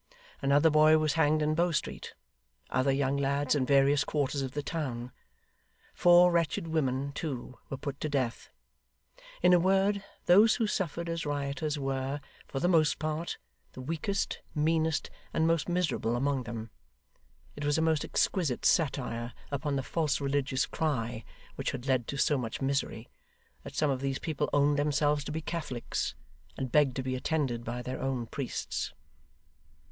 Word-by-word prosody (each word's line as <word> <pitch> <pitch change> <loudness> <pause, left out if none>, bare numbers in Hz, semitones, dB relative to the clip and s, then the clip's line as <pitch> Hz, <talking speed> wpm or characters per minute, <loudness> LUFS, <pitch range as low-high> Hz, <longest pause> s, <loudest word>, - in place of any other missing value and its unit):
Another 145 +3 +4
boy 155 +1 +6
was 155 -1 +1
hanged 155 -1 +3
in 155 +1 +1
Bow 170 +3 +2
Street; 160 - -3 0.6
other 130 +2 +2
young 135 0 +1
lads 140 0 +1
in 135 -4 +1
various 140 +1 +4
quarters 145 -1 -1
of 130 -1 -4
the 145 - -3
town. 130 -7 -4 0.8
Four 175 0 +6
wretched 165 -1 0
women, 140 -3 0
too, 130 -5 -5
were 135 - -4
put 140 0 -5
to 155 - -1
death. 130 -5 -2 0.9
In 180 - +6
a 175 - +6
word, 195 +2 +2 0.2
those 210 +5 +6
who 230 - +1
suffered 170 -5 -2
as 165 0 -2
rioters 145 +1 -2
were, 135 0 -2 0.3
for 135 - -4
the 175 - +1
most 160 -4 +3
part, 155 +2 -3 0.4
the 130 - -8
weakest, 165 +8 -2 0.2
meanest, 160 0 +1 0.2
and 160 - +3
most 165 0 +1
miserable 175 -9 0
among 135 0 0
them. 115 -1 -6 0.8
It 145 - -6
was 145 +1 +2
a - - +2
most 160 -2 +2
exquisite 160 -11 0
satire 125 -7 +1 0.2
upon 140 0 -1
the 135 - -1
false 150 -1 0
religious 140 -1 0
cry 120 -7 -2 0.3
which - - -1
had 125 - -6
led 130 -4 +1
to 140 - -4
so 145 0 +2
much 115 -3 -4
misery, 135 -4 -1 0.5
that - - -10
some 150 -2 +2
of 130 -1 -2
these 135 -1 -1
people 150 -2 -2
owned 145 0 +3
themselves 145 0 +2
to - - -4
be 160 +1 -3
Catholics, 155 -7 -3 0.4
and 130 -2 -3
begged 140 -3 +4
to 130 - -2
be 130 0 -2
attended 130 -4 -1
by 120 +1 -4
their 130 +1 -5
own 130 -3 -1
priests. - - -4
145 Hz, 165 wpm, -30 LUFS, 135-160 Hz, 0.9 s, boy